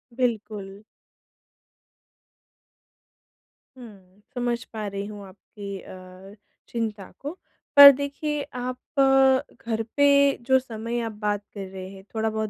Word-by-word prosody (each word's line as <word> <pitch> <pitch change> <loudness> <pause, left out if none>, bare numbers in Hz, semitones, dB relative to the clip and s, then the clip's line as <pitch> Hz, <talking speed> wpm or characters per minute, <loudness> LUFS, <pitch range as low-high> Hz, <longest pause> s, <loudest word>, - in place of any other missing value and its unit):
बिल्कुल। 210 -5 -3 3.0
हुँ, 200 -5 -15
समझ 240 -1 -1
पा 215 -1 -4
रही 200 0 -4
हूँ 205 -1 -9
आपकी 200 +1 -9
अ, 185 +2 -13 0.3
चिंता 220 -4 -4
को। 300 +6 -7 0.4
पर 285 0 +12
देखिए 285 +2 -3
आप 250 0 -4 0.2
अ, 270 -1 +4
घर 225 -1 -1
पे 285 0 +5 0.4
जो 265 0 +5
समय 235 -1 -5
आप 225 - -4
बात 205 -1 -1
कर 200 -2 -6
रहे 185 0 -8
हैं 190 0 -12
थोड़ा 220 0 0
बहुत 220 -1 -3
220 Hz, 120 wpm, -25 LUFS, 200-255 Hz, 3.0 s, पर